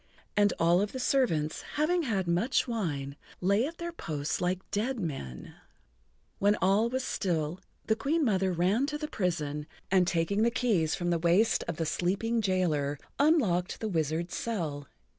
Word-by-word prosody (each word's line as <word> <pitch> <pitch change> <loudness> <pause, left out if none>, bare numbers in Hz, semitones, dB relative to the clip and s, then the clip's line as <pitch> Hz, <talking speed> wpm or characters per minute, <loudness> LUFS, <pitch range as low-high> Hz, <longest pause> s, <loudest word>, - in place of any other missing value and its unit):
And 205 -1 +4
all 170 +2 +4
of 205 - -2
the 260 - -4
servants, 170 - +1 0.2
having 340 +4 +2
had 200 - -1
much 195 +13 +1
wine, 150 - -2 0.2
lay 200 +7 +2
at 335 +2 -8
their 345 0 -4
posts 150 - -3
like 180 +1 -1
dead 230 +5 -1
men. 70 - -5
[Pg - - -12 0.9
63]When 205 +1 +4
all 200 +5 +3
was 260 +1 -2
still 170 -5 -1 0.3
the 220 - +2
Queen 290 +7 +1
Mother 190 -4 +2
ran 190 +10 +2
to 295 0 -2
the 305 0 -4
prison, 150 - -2 0.2
and 185 -2 +4
taking 180 +5 +1
the 230 - +4
keys 225 -10 +1
from 175 -2 -1
the 170 - +1
waist 175 +7 +3
of 170 - -3
the 165 - -1
sleeping 200 +9 0
jailer, 165 -8 0 0.2
unlocked 230 - +2
the 220 - -2
wizard's 165 -1 -1
cell. 155 - -3
185 Hz, 170 wpm, -29 LUFS, 165-230 Hz, 0.9 s, And